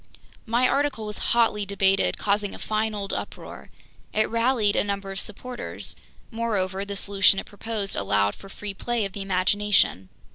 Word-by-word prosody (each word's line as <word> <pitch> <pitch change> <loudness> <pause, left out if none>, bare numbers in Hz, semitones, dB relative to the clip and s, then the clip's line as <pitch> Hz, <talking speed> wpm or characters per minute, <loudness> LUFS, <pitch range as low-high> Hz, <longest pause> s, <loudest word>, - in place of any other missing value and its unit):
My 240 +3 +3
article 275 -6 0
was 210 0 -5
hotly 225 -3 +3
debated, 195 -1 +2
causing 205 0 0
a - - -8
fine 215 0 -1
old 200 -1 -3
uproar. - - -6 0.4
It 215 0 +3
rallied 230 -3 +2
a - - +3
number 200 -1 -3
of 195 - -5
supporters. 245 +5 -6 0.4
Moreover, 200 -5 -1
the 200 0 -5
solution 195 -1 +4
it - - -3
proposed 210 -1 -3
allowed 100 +1 +2
for 195 - -13
free 205 +1 -6
play 235 +2 -1
of 195 - -5
the 200 - -5
imagination. 195 - +2
205 Hz, 160 wpm, -25 LUFS, 195-220 Hz, 0.4 s, solution